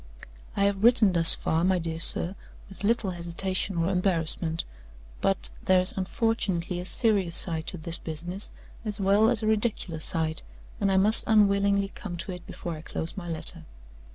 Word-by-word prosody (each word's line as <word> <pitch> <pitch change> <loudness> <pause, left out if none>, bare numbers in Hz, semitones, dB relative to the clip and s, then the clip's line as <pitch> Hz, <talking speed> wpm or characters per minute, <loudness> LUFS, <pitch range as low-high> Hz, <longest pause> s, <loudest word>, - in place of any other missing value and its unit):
"I 200 - +2
have 200 0 0
written 230 -5 +5
thus 165 -1 +9
far, 160 +1 -1
my 185 0 +2
dear 165 -1 -4
sir, 170 +2 +1 0.4
with 195 - -10
little 215 -2 +1
hesitation 175 +2 -1
or 170 +2 0
embarrassment. 170 -3 -1 0.6
But - - -1
there 185 -1 +4
is 185 +1 -2
unfortunately 190 -3 -2
a 180 - -7
serious 200 -8 +1
side 160 -3 +4
to 180 - -3
this 165 +1 -2
business 175 +5 -4 0.3
as 210 -2 -4
well 200 +3 +3
as 235 -3 0
a - - -1
ridiculous 210 -7 -1
side; 160 -1 -1 0.4
and 200 -1 +1
I 190 - +2
must 210 +3 +3
unwillingly 200 -2 +3
come 180 -3 -8
to 185 - -4
it 180 -1 -9
before 170 - -6
I 155 - -9
close 160 0 -6
my 175 -3 -7
letter. 160 -1 -3
185 Hz, 175 wpm, -26 LUFS, 170-200 Hz, 0.6 s, thus